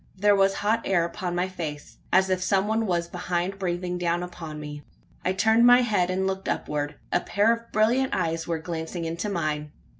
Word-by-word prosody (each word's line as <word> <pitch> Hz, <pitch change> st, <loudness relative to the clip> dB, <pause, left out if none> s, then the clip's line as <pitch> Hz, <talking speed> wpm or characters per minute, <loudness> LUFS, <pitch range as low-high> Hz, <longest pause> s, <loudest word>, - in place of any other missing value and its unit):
There 205 Hz, +2 st, +4 dB
was 195 Hz, 0 st, +3 dB
hot 215 Hz, +3 st, +1 dB
air 175 Hz, -3 st, +2 dB
upon 175 Hz, 0 st, -4 dB
my 180 Hz, +1 st, +1 dB
face 155 Hz, -5 st, -7 dB
as 190 Hz, 0 st, +4 dB
if 185 Hz, -1 st, +1 dB
some 190 Hz, +1 st, +2 dB
one 220 Hz, 0 st, 0 dB
was 170 Hz, -2 st, 0 dB
behind 180 Hz, +2 st, -2 dB
breathing 180 Hz, -1 st, -2 dB
down 175 Hz, 0 st, 0 dB
upon 165 Hz, -4 st, -7 dB
me. 150 Hz, -1 st, -7 dB, 0.4 s
I 185 Hz, -, +1 dB
turned 220 Hz, +5 st, +4 dB
my 245 Hz, +1 st, +8 dB
head, 205 Hz, -6 st, +1 dB
and 190 Hz, +1 st, 0 dB
looked 190 Hz, 0 st, -2 dB
upward. 145 Hz, 0 st, -2 dB, 0.2 s
A -, -, +4 dB
pair 210 Hz, +3 st, +2 dB
of 230 Hz, 0 st, -8 dB
brilliant 240 Hz, +5 st, +2 dB
eyes 165 Hz, -2 st, -1 dB
were 170 Hz, -1 st, 0 dB
glancing 165 Hz, +1 st, -5 dB
into 170 Hz, +5 st, -3 dB
mine. 155 Hz, -5 st, -2 dB
180 Hz, 200 wpm, -26 LUFS, 170-200 Hz, 0.4 s, my